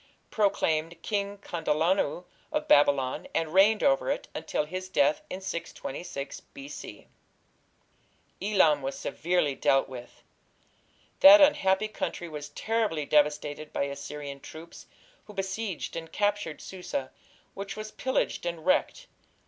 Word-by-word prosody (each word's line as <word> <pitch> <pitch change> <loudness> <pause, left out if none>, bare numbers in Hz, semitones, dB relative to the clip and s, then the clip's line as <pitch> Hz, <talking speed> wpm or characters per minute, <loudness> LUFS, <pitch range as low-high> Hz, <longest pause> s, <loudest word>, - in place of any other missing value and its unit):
proclaimed 170 -6 +1
King 200 -1 -2
Kandalanu 170 -1 0 0.3
of 305 0 -1
Babylon, 140 -3 +3
and 160 -1 0
reigned 205 +3 +5
over 275 -1 +3
it 280 - -2
until 155 -1 -2
his 185 +4 -6
death 295 +8 +2
in 185 - -5
626 170 -4 -5
B.C. 280 0 -10 1.4
Elam 185 -8 +3
was 135 +1 -4
severely 170 -4 0
dealt 135 0 +2
with. 125 -2 -11 1.0
That 295 +2 +10
unhappy 215 -9 +4
country 175 -4 -4
was 150 -2 -7
terribly 210 -3 -1
devastated 150 0 +1
by - - -1
Assyrian 140 0 -6
troops, 160 +4 -11 0.4
who 210 - -13
besieged 195 -1 -3
and 165 -1 -6
captured 205 -6 -1
Susa, 180 -8 -5 0.4
which 195 +1 -6
was 215 0 -6
pillaged 260 0 -1
and 170 -2 -4
wrecked. - - +1
175 Hz, 120 wpm, -28 LUFS, 150-205 Hz, 1.4 s, That